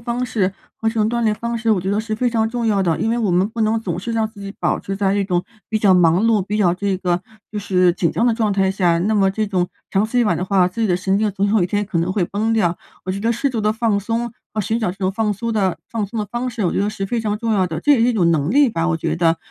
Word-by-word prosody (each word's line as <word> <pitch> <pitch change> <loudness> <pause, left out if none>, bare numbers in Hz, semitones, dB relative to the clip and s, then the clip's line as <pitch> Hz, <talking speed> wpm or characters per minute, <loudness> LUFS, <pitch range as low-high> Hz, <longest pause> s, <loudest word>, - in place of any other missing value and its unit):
方 240 +1 -2
式 195 -6 0 0.2
和 225 - -1
这 225 - -3
种 215 0 +1
锻 235 0 -1
炼 215 -1 +2
方 235 +1 -3
式， 225 -1 +2
我 185 - +1
觉 190 - -2
得 205 - +1
是 220 0 -3
非 245 +2 0
常 225 -1 +1
重 240 0 -3
要 210 -3 +2
的， 170 -4 +1
因 225 - +1
为 240 - 0
我 205 -6 +1
们 185 +4 +2
不 225 0 -6
能 220 +1 +1
总 175 -5 -3
是 230 +5 -4
让 225 -1 0
自 210 - -14
己 200 0 -7
保 - - +1
持 195 - -5
在 195 -1 +1
这 200 -1 +1
种 180 -2 0 0.2
比 220 - 0
较 205 -3 +4
忙 175 +3 +4
碌， 225 -2 +3
比 200 +3 -3
较 180 -5 +3
这 195 +1 -1
个 180 -1 0 0.3
就 210 - -4
是 185 -3 +2
紧 170 -2 0
张 230 - +1
的 240 - +4
状 220 -2 0
态 195 -1 +2
下， 180 -3 +2
那 210 +5 +1
么 195 -1 +4
这 215 +3 -1
种 185 -3 0 0.2
长 200 +3 +2
此 245 +2 +1
以 - - +4
往 210 - +1
的 180 - -2
话， 185 -2 +3
自 230 +5 -7
己 220 - +2
的 180 -2 +2
神 190 +2 0
经 215 - +1
总 200 +1 -1
有 220 - +4
一 - - 0
天 205 +2 -1
可 185 -4 -2
能 175 +3 0
会 190 -4 +1
崩 215 +5 -1
掉。 180 -6 +1 0.3
我 185 - -3
觉 195 - -3
得 230 +3 +1
适 275 +5 -1
度 230 -3 -2
的 210 +1 +1
放 220 -2 +1
松， 230 +3 -2 0.2
和 215 - 0
寻 225 +3 -1
找 200 -6 -1
这 - - -15
种 190 -1 0
放 210 +1 0
松 230 +4 -3
的 190 -6 0
放 220 -3 -2
松 220 +2 -4
的 - - -1
方 240 +3 -3
式， 230 -4 -3
我 175 - +1
觉 - - -1
得 200 - +1
是 210 -2 -4
非 230 +3 -1
常 210 -1 -1
重 225 +1 -1
要 190 -3 +2
的， 160 -1 -4
这 295 - +1
也 280 - +6
是 230 - +4
一 245 - +3
种 175 -6 +2
能 155 +2 +1
力 280 0 +5
吧， 165 -5 -1
我 160 - +1
觉 165 - -2
得。 165 -1 +2
205 Hz, 355 characters per minute, -20 LUFS, 185-225 Hz, 0.3 s, 也